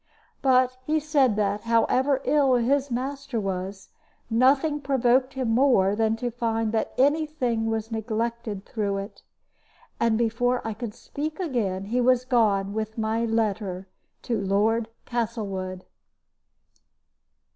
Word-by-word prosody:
But 255 -1 +3
he 310 +4 +1
said 285 -7 +2
that, 205 0 0
however 255 +4 +2
ill 280 -4 +3
his 270 +3 +1
master 270 0 -3
was, 195 0 -4 0.4
nothing 275 +6 +3
provoked 260 -1 +2
him 255 -4 -1
more 225 -6 +4
than 220 0 +1
to 240 +1 -3
find 225 -2 -1
that 220 -1 -2
any 295 +4 +3
thing 240 -7 -1
was 225 0 -2
neglected 225 -1 -3
through 205 -3 -2
it. 195 +2 -7 0.8
And 230 -1 +2
before 235 +2 +1
I 225 - -2
could 220 -1 -6
speak 305 +3 -5
again 215 - -1
he 240 +5 0
was 255 0 +3
gone 205 -6 +2
with 220 +1 -4
my 220 +1 0
letter 210 -4 -1 0.4
to 230 -4 -1
Lord 215 +4 +1 0.2
Castlewood. 200 -6 -3
230 Hz, 130 wpm, -25 LUFS, 215-255 Hz, 0.8 s, more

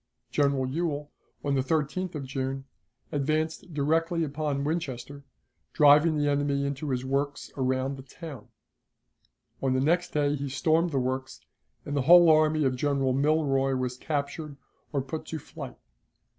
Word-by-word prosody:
General 140 -2 +2
Ewell, 150 0 -2 0.3
on 140 - +1
the 135 - +2
13th 160 +5 -1
of 140 -3 -4
June, 135 0 -3 0.5
advanced 155 +4 -1
directly 165 +3 +1
upon 145 -1 -2
Winchester, 140 -3 -4 0.5
driving 150 +2 +6
the 145 0 +1
enemy 140 -1 +1
into 140 +1 -3
his 130 -1 -1
works 140 +2 -2
around 130 +1 -1
the - - -8
town. 140 -3 -10 1.1
On 135 -1 +1
the 130 - +2
next 170 +6 +2
day 145 -1 +1
he 140 -1 -4
stormed 160 +6 +2
the 140 - -2
works, 130 +1 -2 0.4
and 145 - -3
the 140 - +2
whole 170 +4 +8
army 155 0 +4
of 130 -2 +1
General 135 -1 +1
Milroy 135 -2 +2
was 125 -1 -2
captured 145 +1 -4 0.3
or 140 -3 -1
put 155 +3 -6
to 160 - -4
flight. 150 - -9
145 Hz, 150 wpm, -28 LUFS, 135-155 Hz, 1.1 s, whole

